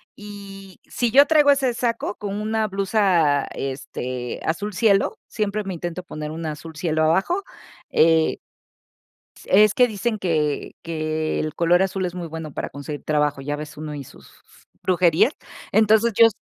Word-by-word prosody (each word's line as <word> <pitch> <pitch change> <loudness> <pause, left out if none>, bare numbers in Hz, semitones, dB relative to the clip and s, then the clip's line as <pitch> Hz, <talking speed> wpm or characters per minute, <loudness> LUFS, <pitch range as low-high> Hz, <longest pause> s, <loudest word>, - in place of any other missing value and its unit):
Y 195 -2 -11
si 240 -2 -1
yo 280 +3 +7
traigo 300 -3 +5
ese 265 -4 +1
saco 230 -3 -1
con 205 0 -4
una 220 0 0
blusa, 190 -8 +2
este, 130 -2 -5
azul 205 +6 -2
cielo, 200 0 +2
siempre 210 -1 -2
me 190 -2 -5
intento 175 +1 -5
poner 155 -3 -6
un 165 +1 -6
azul 160 +1 -7
cielo 155 -1 0
abajo, 195 - +1 0.5
eh, 160 0 +4 1.1
es 210 +1 +5
que 250 -1 +5
dicen 215 +1 -2
que 155 -6 -1
que 155 -1 -2
el 155 -1 -2
color 175 +2 +3
azul 190 0 -2
es 180 0 -5
muy 175 -2 -5
bueno 160 -2 -7
para - - -4
conseguir 145 +1 -7
trabajo, 150 -2 0
ya 145 +2 -3
ves 150 0 -8
uno 150 0 -6
y 140 - -6
sus - - -16 0.5
brujerías. 185 - +3 0.4
Entonces, 220 +1 +4
yo 230 - +9
180 Hz, 155 wpm, -22 LUFS, 155-210 Hz, 1.1 s, yo